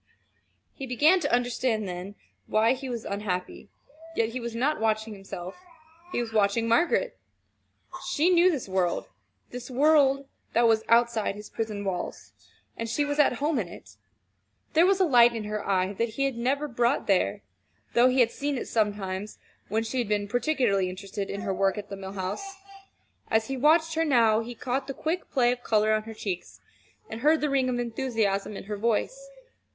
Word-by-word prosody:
He 270 Hz, -, -7 dB
began 300 Hz, +9 st, +4 dB
to 290 Hz, -4 st, -2 dB
understand 240 Hz, -3 st, 0 dB
then, 180 Hz, +3 st, -6 dB, 0.3 s
why 220 Hz, +3 st, +3 dB
he 265 Hz, 0 st, -6 dB
was 235 Hz, -3 st, -5 dB
unhappy 200 Hz, -3 st, -4 dB, 0.5 s
yet 225 Hz, -5 st, +1 dB
he 250 Hz, +2 st, -4 dB
was 235 Hz, -1 st, -5 dB
not 285 Hz, +6 st, 0 dB
watching 220 Hz, 0 st, 0 dB
himself, 190 Hz, -2 st, -8 dB, 0.6 s
he -, -, -1 dB
was 230 Hz, -2 st, -4 dB
watching 215 Hz, +2 st, +2 dB
Margaret. 340 Hz, -, +2 dB, 0.9 s
She 325 Hz, +5 st, +2 dB
knew 355 Hz, +1 st, +6 dB
this 295 Hz, -, -2 dB
world 185 Hz, -2 st, 0 dB, 0.5 s
this 245 Hz, +1 st, -7 dB
world 275 Hz, 0 st, +3 dB, 0.3 s
that 235 Hz, 0 st, +4 dB
was 220 Hz, -1 st, +3 dB
outside 230 Hz, -3 st, +3 dB
his 210 Hz, 0 st, -10 dB
prison 215 Hz, -3 st, -4 dB
walls; 180 Hz, -2 st, -4 dB, 0.4 s
and 230 Hz, 0 st, -4 dB
she 290 Hz, +6 st, 0 dB
was 290 Hz, 0 st, -2 dB
at 290 Hz, -, +5 dB
home 290 Hz, +3 st, 0 dB
in 195 Hz, -, -2 dB
it. 100 Hz, -, -13 dB, 0.8 s
There 330 Hz, +3 st, +5 dB
was 390 Hz, 0 st, +3 dB
a -, -, +5 dB
light 240 Hz, -5 st, +5 dB
in 225 Hz, -, -3 dB
her 210 Hz, 0 st, -4 dB
eye 190 Hz, 0 st, +1 dB
that 230 Hz, +4 st, -1 dB
he 235 Hz, +5 st, -2 dB
had 270 Hz, -2 st, -1 dB
never 270 Hz, +5 st, 0 dB
brought 240 Hz, +1 st, +1 dB
there, 180 Hz, -, +1 dB, 0.5 s
though 240 Hz, +1 st, +5 dB
he 255 Hz, 0 st, +3 dB
had 235 Hz, -1 st, +3 dB
seen 285 Hz, -1 st, -2 dB
it -, -, -5 dB
sometimes 205 Hz, -2 st, -2 dB, 0.3 s
when 220 Hz, +3 st, 0 dB
she 230 Hz, +3 st, -3 dB
had 240 Hz, -, -1 dB
been 205 Hz, -1 st, 0 dB
particularly 240 Hz, -6 st, +1 dB
interested 195 Hz, +1 st, -6 dB
in 200 Hz, -, -4 dB
her 195 Hz, -, -2 dB
work 195 Hz, +1 st, +1 dB
at 205 Hz, 0 st, -6 dB
the 200 Hz, -, -5 dB
Mill 195 Hz, 0 st, -8 dB
House. 200 Hz, -, -5 dB, 0.7 s
As 220 Hz, +1 st, +1 dB
he 270 Hz, -, -1 dB
watched 315 Hz, +4 st, +3 dB
her 325 Hz, 0 st, +1 dB
now, 230 Hz, -7 st, +4 dB
he 235 Hz, +1 st, -6 dB
caught 255 Hz, +3 st, -3 dB
the 275 Hz, -, -5 dB
quick 335 Hz, +4 st, -3 dB
play 245 Hz, -3 st, +3 dB
of 245 Hz, 0 st, -4 dB
color 215 Hz, -2 st, +2 dB
on 215 Hz, 0 st, 0 dB
her 225 Hz, 0 st, -8 dB
cheeks, 190 Hz, -4 st, -5 dB, 0.5 s
and 220 Hz, +1 st, -7 dB
heard 310 Hz, +3 st, +4 dB
the 300 Hz, -1 st, -1 dB
ring 265 Hz, -2 st, +2 dB
of 245 Hz, -, -1 dB
enthusiasm 225 Hz, -5 st, -1 dB
in -, -, -7 dB
her 210 Hz, +1 st, -5 dB
voice. 235 Hz, -, -1 dB
230 Hz, 190 wpm, -27 LUFS, 205-270 Hz, 0.9 s, knew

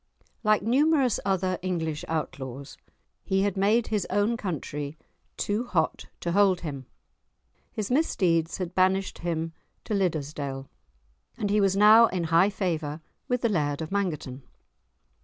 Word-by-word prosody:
Like 215 Hz, -1 st, +3 dB
numerous 270 Hz, +1 st, +3 dB
other 185 Hz, -2 st, 0 dB
English 165 Hz, -4 st, -2 dB
outlaws, 140 Hz, -4 st, -5 dB, 0.5 s
he 195 Hz, 0 st, +1 dB
had 200 Hz, -2 st, 0 dB
made 210 Hz, +4 st, +2 dB
his 210 Hz, -3 st, -1 dB
own 205 Hz, +4 st, +1 dB
country 150 Hz, -, -4 dB, 0.4 s
too 210 Hz, +3 st, -1 dB
hot 165 Hz, -8 st, -1 dB
to 170 Hz, -, -2 dB
hold 195 Hz, -1 st, +3 dB
him; 140 Hz, -5 st, -6 dB, 0.8 s
his 215 Hz, +1 st, -4 dB
misdeeds 175 Hz, -, +1 dB
had 180 Hz, -2 st, -4 dB
banished 190 Hz, +1 st, +1 dB
him 165 Hz, -1 st, -2 dB, 0.3 s
to 220 Hz, -, -4 dB
Liddesdale, 145 Hz, -7 st, -2 dB, 0.7 s
and 205 Hz, -3 st, -1 dB
he 210 Hz, 0 st, +3 dB
was 195 Hz, -1 st, +2 dB
now 215 Hz, +3 st, +8 dB
in 180 Hz, -4 st, -2 dB
high 175 Hz, +4 st, +6 dB
favour 165 Hz, -7 st, -2 dB, 0.3 s
with 250 Hz, -1 st, 0 dB
the 235 Hz, -, +2 dB
Laird 145 Hz, -7 st, 0 dB
of 160 Hz, +1 st, -5 dB
Mangerton. 155 Hz, -10 st, -2 dB
185 Hz, 140 wpm, -27 LUFS, 160-205 Hz, 0.8 s, now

